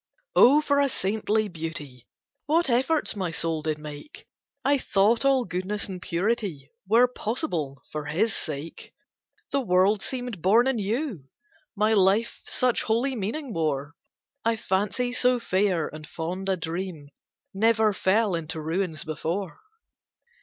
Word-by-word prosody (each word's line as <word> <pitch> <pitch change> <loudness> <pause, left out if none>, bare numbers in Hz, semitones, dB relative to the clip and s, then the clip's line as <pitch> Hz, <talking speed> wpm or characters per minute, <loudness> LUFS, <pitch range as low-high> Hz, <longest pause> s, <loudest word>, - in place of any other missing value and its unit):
Oh 285 +5 +7
for 285 -2 +2
a 280 -1 +3
saintly 215 0 0
beauty, 155 - -7 0.4
What 320 -2 +2
efforts 265 +5 +1
my 190 -4 -2
soul 165 -1 -1
did 155 0 -1
make; 150 - -10 0.4
I 280 0 +3
thought 215 +2 +2
all 270 -2 +3
goodness 185 +3 -3
and 185 -2 -7
purity 175 -7 -2 0.2
Were 235 +5 +5
possible 210 - -3
for 150 -1 -4
his 190 +9 +1
sake; 155 +1 -6 0.6
The 280 - +1
world 190 -1 +3
seemed 245 -7 -4
born 220 +7 +5
anew, 230 - -1 0.5
my 215 +2 +2
life 200 +3 +2
Such 250 -2 +1
holy 240 +4 0
meaning 235 +5 -4
wore, 145 -3 -1 0.5
I 230 0 +2
fancy 215 +5 -1
so 250 0 +3
fair 185 -6 +1
and 155 0 -10
fond 180 +4 -4
a 190 - +1
dream 165 -3 -5 0.4
Never 220 +1 +3
fell 200 +2 +2
into 165 -1 -3
ruins 160 0 -2
before. 165 +5 -3
195 Hz, 135 wpm, -26 LUFS, 165-235 Hz, 0.6 s, Oh